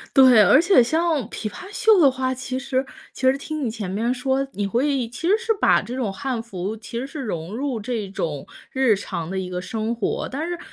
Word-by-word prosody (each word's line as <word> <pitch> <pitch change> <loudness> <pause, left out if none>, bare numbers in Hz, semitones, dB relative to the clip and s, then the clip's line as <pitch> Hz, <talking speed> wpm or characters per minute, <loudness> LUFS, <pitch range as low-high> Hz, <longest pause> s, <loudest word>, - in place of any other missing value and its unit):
对， 255 -5 +8
而 265 - +6
且 350 -7 +5
像 320 +5 +1
琵 215 - -5
琶 365 - -9
袖 435 -2 +4
的 280 - +7
话， 260 0 -1
其 255 0 -4
实 265 0 -1 0.3
其 - - -11
实 270 - +1
听 305 +1 -5
你 235 - 0
前 215 -4 -5
面 225 +5 -1
说， 265 +2 -1
你 205 0 -2
会 255 +3 0
其 290 +8 -4
实 420 - +5
是 455 -1 0
把 - - +5
这 245 - -6
种 235 -7 -1
汉 260 0 -3
服 205 -1 -5
其 230 +2 -6
实 260 - -3
是 280 +2 -8
融 185 -3 -4
入 260 -3 -2
这 220 -2 -3
种 155 -7 -4 0.3
日 260 -5 +3
常 170 -4 -5
的 190 - -3
一 185 -1 -3
个 180 0 -4
生 225 +2 -3
活。 225 - -2
但 300 +6 -3
是 350 0 -3
250 Hz, 245 characters per minute, -23 LUFS, 210-275 Hz, 0.3 s, 对